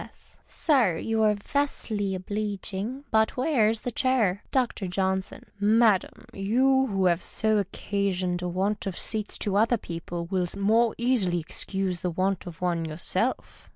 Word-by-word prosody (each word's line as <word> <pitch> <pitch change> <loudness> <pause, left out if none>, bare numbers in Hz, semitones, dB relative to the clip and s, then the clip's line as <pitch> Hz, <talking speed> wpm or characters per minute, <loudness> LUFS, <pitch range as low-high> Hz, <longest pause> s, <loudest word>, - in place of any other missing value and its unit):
S.— - - -18
Sir, 245 - +2
you 225 +5 -1
are 210 -1 +4
vastly 205 -4 -1
oblecging, 205 +5 -4
but 220 +2 +2
where's 230 -6 +2
the 245 - -3
chair? 225 -7 +1
Dr. 245 -7 0
Johnson. 190 +1 -2
— - - -34
Madam, 215 -1 +3
you 265 +7 +2
wlio 195 -2 +2
have 170 0 +2
so 220 - -1
often 215 - +4
occasioned 190 -2 -2
a 180 - -2
want 195 +4 -1
of 185 - -4
seats 215 -2 0
to 200 -1 0
other 230 +3 +3
people, 170 -2 -6
will 180 0 -1
the 185 - -6
more 220 +3 +3
easily 235 -8 +2
excuse 185 +3 -2
the 180 - -2
want 185 +2 -1
of 170 -1 -9
one 175 -2 0
yourself. 175 +9 -3
200 Hz, 160 wpm, -26 LUFS, 185-225 Hz, -, are